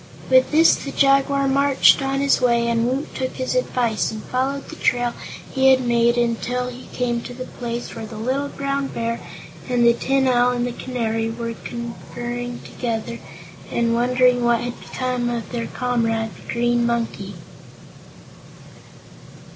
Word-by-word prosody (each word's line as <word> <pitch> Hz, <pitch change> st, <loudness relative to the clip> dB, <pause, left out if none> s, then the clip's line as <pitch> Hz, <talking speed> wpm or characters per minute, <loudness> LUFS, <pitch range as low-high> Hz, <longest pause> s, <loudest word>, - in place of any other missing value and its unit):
With 260 Hz, 0 st, +6 dB
this 320 Hz, +2 st, +6 dB
the 275 Hz, -, -6 dB
Jaguar 275 Hz, 0 st, +3 dB
marched 275 Hz, 0 st, +4 dB
on 270 Hz, 0 st, 0 dB
his 280 Hz, -2 st, +3 dB
way 235 Hz, -1 st, +3 dB
and 230 Hz, 0 st, +1 dB
Woot 270 Hz, +3 st, -3 dB
took 260 Hz, 0 st, -3 dB
his 255 Hz, -, -2 dB
advice 245 Hz, -, 0 dB
and 220 Hz, -1 st, -7 dB
followed 270 Hz, +2 st, -2 dB
the -, -, -9 dB
trail 245 Hz, -1 st, +1 dB, 0.4 s
he 265 Hz, 0 st, +4 dB
had 260 Hz, -1 st, +4 dB
made 235 Hz, 0 st, +3 dB
until 240 Hz, +1 st, 0 dB
he 250 Hz, 0 st, -10 dB
came 240 Hz, -1 st, -1 dB
to 245 Hz, -, -8 dB
the 255 Hz, +1 st, -6 dB
place 240 Hz, -1 st, -5 dB
where 225 Hz, -1 st, -6 dB
the 215 Hz, -, -9 dB
little 260 Hz, +6 st, -1 dB
Brown 275 Hz, 0 st, -2 dB
Bear, 230 Hz, -1 st, -3 dB, 0.5 s
and 245 Hz, -1 st, +3 dB
the 235 Hz, -, +7 dB
Tin 265 Hz, +2 st, +1 dB
Owl, 245 Hz, 0 st, +3 dB
and 245 Hz, 0 st, -1 dB
the 245 Hz, -, -2 dB
Canary 225 Hz, -3 st, -2 dB
were 230 Hz, 0 st, -4 dB
conferring 240 Hz, +1 st, -6 dB
together 235 Hz, -1 st, -4 dB, 0.5 s
and 235 Hz, 0 st, +1 dB
wondering 250 Hz, +1 st, +3 dB
what 235 Hz, -1 st, +3 dB
had 245 Hz, 0 st, -5 dB
become 250 Hz, -2 st, -2 dB
of 235 Hz, -1 st, -4 dB
their 235 Hz, -2 st, -3 dB
comrade, 225 Hz, -3 st, -1 dB
the -, -, -10 dB
Green 240 Hz, 0 st, +1 dB
Monkey. 230 Hz, -4 st, -2 dB
245 Hz, 160 wpm, -22 LUFS, 235-260 Hz, 0.5 s, the